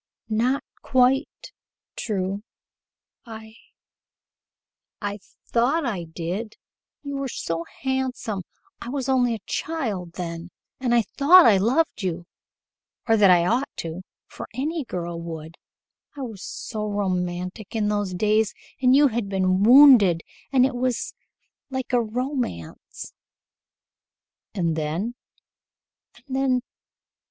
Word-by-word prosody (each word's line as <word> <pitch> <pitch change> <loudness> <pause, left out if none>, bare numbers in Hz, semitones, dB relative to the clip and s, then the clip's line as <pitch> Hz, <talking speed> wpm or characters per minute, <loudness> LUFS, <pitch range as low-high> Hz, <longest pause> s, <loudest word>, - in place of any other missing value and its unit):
"Not 240 +5 +1 0.2
quite 260 +3 +1 0.4
true. 195 -2 -2 0.8
I 220 -2 -10 1.5
I 205 0 -4 0.3
thought 270 +7 +1
I 195 -8 -2
did. 175 +7 -5 0.5
You 280 -1 -4
were 275 0 -2
so 165 -8 -3 0.2
handsome! 260 -6 -2 0.4
I 240 - -6
was 270 -1 -3
only 250 -3 +2
a 210 - -11
child 215 - -3
then 170 -1 -6 0.3
and 245 -2 +1
I 235 - +4
thought 320 - +6
I 210 -4 +6
loved 245 +9 +1
you 175 -2 -3 0.8
or 225 - +5
that 205 -3 +5
I 175 -1 +5
ought 245 +9 +1 0.2
to 165 +2 -5 0.2
for - - -9
any 305 +5 -2
girl 170 -4 -5
would 160 -1 -7 0.6
I - - -5
was 220 -6 -7
so 215 -2 -5
romantic 185 0 -3
in 215 -2 +1
those 205 -3 -1
days 215 +2 +2 0.3
and 255 0 +5
you 285 0 +6
had 225 -3 -2
been 185 -1 +1
wounded 230 - +7 0.3
and 260 -2 +5
it 270 - -1
was 250 -1 -1 0.6
like 260 -1 -4
a 245 - +4
romance 240 - -4 0.7
" - - -69
"And 170 -4 0
then?" 160 +9 -2
220 Hz, 120 wpm, -24 LUFS, 185-255 Hz, 1.5 s, wounded